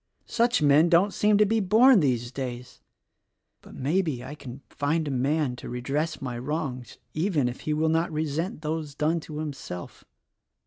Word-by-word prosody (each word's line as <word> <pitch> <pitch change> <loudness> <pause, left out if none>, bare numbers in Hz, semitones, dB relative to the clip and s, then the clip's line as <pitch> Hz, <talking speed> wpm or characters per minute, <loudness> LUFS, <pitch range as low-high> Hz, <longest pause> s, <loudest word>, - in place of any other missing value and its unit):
Such 235 -6 +1
men 150 +4 +5
don't 185 +4 +4
seem 210 0 +3
to 210 - +5
be 225 +2 +1
born 220 +5 +6
these 125 -6 0
days. 125 -2 -6 0.8
But. - - -14
maybe, 150 -2 -1
I 130 +3 -7
can 140 -3 -10
find 155 +4 -1
a - - -2
man 135 +1 0
to - - -8
redress 135 +6 -2
my 125 -3 -5
wrongs, 130 -3 -4 0.2
even 155 -5 +1
if 125 - -5
he 155 - -1
will 160 +1 +1
not 165 +2 +1
resent 155 +2 -3
those 155 -2 -3
done 155 +3 +1
to 155 -1 -9
himself. 140 - -7
150 Hz, 170 wpm, -26 LUFS, 130-165 Hz, 0.8 s, born